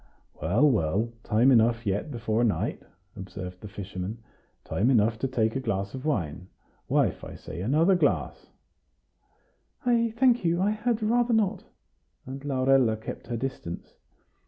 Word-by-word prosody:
"Well, 100 - +3
well, 110 - +1
time 115 +5 +3
enough 115 -1 +3
yet 100 +8 -1
before 115 -3 -1
night," 110 -4 0 0.3
observed 90 -1 -8
the 105 - -7
fisherman; 100 +1 -6 0.5
"time 110 +7 0
enough 110 -3 +3
to 135 - 0
take 115 -3 0
a - - 0
glass 100 -5 -2
of 130 +1 -7
wine. 90 - -2 0.4
Wife, - - +1
I - - -8
say, 85 - -8
another 155 - +3
glass!" 180 - 0 1.4
"I 230 -2 +2
thank 245 -3 +4
you; 170 0 +1
I 200 +3 +2
had 220 +1 -1
rather 240 +2 +2
not;" 210 -4 0 0.6
and 135 +2 -7
Laurella 130 -4 +3
kept 110 - -8
her 120 - -3
distance. 120 -9 -5
120 Hz, 145 wpm, -27 LUFS, 105-155 Hz, 1.4 s, thank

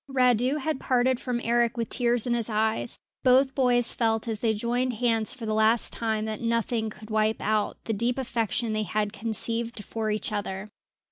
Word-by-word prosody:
Radu 250 0 +3
had 305 -1 -2
parted 255 0 +2
from 250 -2 -2
Eric 235 0 +2
with 230 -1 -1
tears 240 -2 +1
in 245 - +1
his 235 -1 -1
eyes; 220 +2 0 0.2
both 265 +1 +4
boys 245 -3 +2
felt 225 -1 0
as 220 -2 -2
they 225 0 +2
joined 240 +4 -1
hands 225 -1 +1
for 240 -3 -7
the 215 - -1
last 220 +2 +3
time 220 -2 -1
that 220 -1 -4
nothing 230 -1 0
could 215 +1 -12
wipe 215 0 +1
out 215 0 0
the 225 - -2
deep 235 +4 0
affection 230 -2 -1
they 215 - 0
had 210 +1 -1
conceived 230 +1 -2
for 220 +1 -3
each 215 +1 -2
other. 205 0 -4
230 Hz, 190 wpm, -27 LUFS, 215-245 Hz, 0.2 s, both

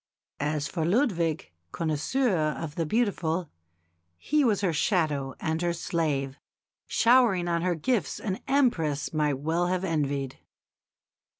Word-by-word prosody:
As 150 0 -1
for 160 +3 -3
Ludwig, 170 - 0 0.2
connoisseur 175 - 0 0.2
of 160 -3 -5
the 165 -1 -2
beautiful, 180 -6 0 0.7
he 300 - +1
was 215 -6 +2
her 185 -4 +1
shadow 150 - 0
and 160 +1 -1
her 175 -1 +1
slave, 150 -6 -2 0.5
showering 230 -7 +4
on 170 -1 0
her 180 0 +1
gifts 185 - -1
an 190 -3 -3
Empress 180 - +1
might 150 -3 +1
well 165 +5 0
have 185 +1 -1
envied. 140 -6 -2
165 Hz, 125 wpm, -27 LUFS, 150-195 Hz, 0.7 s, showering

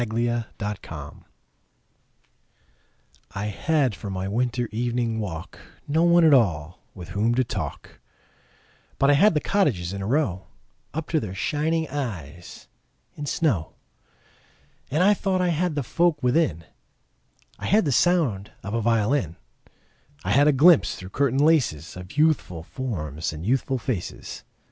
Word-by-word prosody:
Good 120 +1 0 0.3
Hours 75 -3 -8 2.2
I 100 +1 -3
HAD 135 +4 0
for 100 +1 -7
my 95 0 -3
winter 120 +3 -1
evening 120 0 -1
walk 80 -6 -6 0.3
No 160 +3 +2
one 175 0 +5
at 155 - +6
all 90 - +2 0.2
with 90 -2 -9
whom 105 +4 +1
to 130 - +3
talk, - - -6 1.0
But 140 +1 +4
I - - +5
had 180 +6 +5
the - - +3
cottages 120 - 0
in 100 - -5
a 95 - -3
row 115 - 0 0.5
Up 160 0 -3
to 160 - +2
their 95 -7 -6
shining 160 - 0
eyes 90 - -6 0.5
in 145 - -6
snow. 120 - 0 1.2
And 155 +6 +2
I 205 +2 +6
thought 190 -2 -1
I 180 -1 +2
had 170 0 0
the 145 - -1
folk 165 +2 +1
within: 125 - +1 1.0
I - - -4
had 210 -1 +3
the 145 - +1
sound 135 - +2
of 100 - -5
a 115 - 0
violin; 110 - +1 0.9
I 100 - -1
had 140 +6 +5
a - - +6
glimpse 155 +4 +5
through 90 - -9
curtain 135 +4 0
laces 115 - +1
Of 90 +6 -10
youthful 150 - +1
forms 85 - -4
and 75 +3 -7
youthful 130 +3 +1
faces. 120 - -5
120 Hz, 145 wpm, -24 LUFS, 95-150 Hz, 2.2 s, at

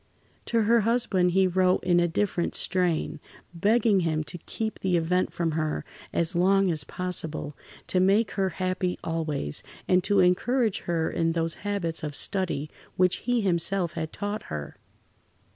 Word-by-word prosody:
To 230 -1 +2
her 230 +2 +4
husband 210 -5 +2
he 190 0 +4
wrote 185 0 +2
in 175 -1 +3
a 175 - +3
different 175 0 -1
strain, 175 -4 0 0.3
begging 210 +3 +3
him 160 -3 0
to 175 - -8
keep 220 +6 -5
the 185 -2 +1
event 180 +3 0
from 170 -1 -1
her 155 -1 -2 0.3
as 170 +2 0
long 190 +1 +3
as 155 -3 -1
possible, 160 -4 -3 0.3
to 185 - 0
make 200 +4 +3
her 195 -1 0
happy 185 -1 -1
always, 155 - -1 0.3
and 180 -1 +3
to 205 -1 +3
encourage 215 +5 +2
her 165 -2 +1
in 165 0 0
those 165 -1 0
[Pg - - -17 0.2
69]habits 165 -1 -2
of 150 -2 -4
study 170 -7 0 0.3
which 180 -1 +2
he 245 0 0
himself 180 -1 +1
had 160 -1 -4
taught 205 +1 -4
her. 75 -2 -6
180 Hz, 160 wpm, -26 LUFS, 165-195 Hz, 0.3 s, her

